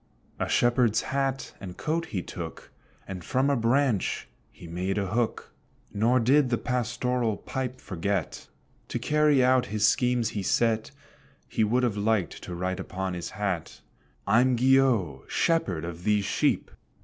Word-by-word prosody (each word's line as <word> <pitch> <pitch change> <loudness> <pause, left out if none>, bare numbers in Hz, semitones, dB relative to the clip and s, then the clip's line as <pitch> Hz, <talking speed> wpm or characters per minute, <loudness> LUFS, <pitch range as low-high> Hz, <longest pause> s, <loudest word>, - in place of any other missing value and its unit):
A - - -1
Shepherd's 120 -2 +3
hat 135 -1 -2
and 90 -3 -8
coat 165 +2 -1
he 90 -5 -3
took, 85 -3 -8 0.4
And 90 -3 -6
from 135 +8 +1
a - - +3
branch 120 -2 +1 0.2
he - - -14
made 90 +4 -2
a 100 - 0
hook; 115 +2 -2 0.4
Nor 115 +5 +3
did 130 +3 +4
the 120 - +1
pastoral 125 -2 -1
pipe 130 -1 -4
forget. 95 -2 -3 0.4
To - - -3
carry 150 -3 +3
out 130 0 +3
his 105 +1 +1
schemes 125 -2 +2
he 105 - -3
set, 110 +3 +1 0.6
He 110 - 0
would 120 +4 +2
have 115 -4 0
liked 105 -4 0
to 90 - -6
write 90 +1 -2
upon 95 0 -4
his 85 -1 -5
hat, 95 -5 -3 0.4
"I'm 125 +5 +4
Guillot, 120 - +2
Shepherd 95 - +1
of 85 0 -7
these 105 -1 +2
sheep!" - - 0
115 Hz, 150 wpm, -27 LUFS, 95-125 Hz, 0.6 s, did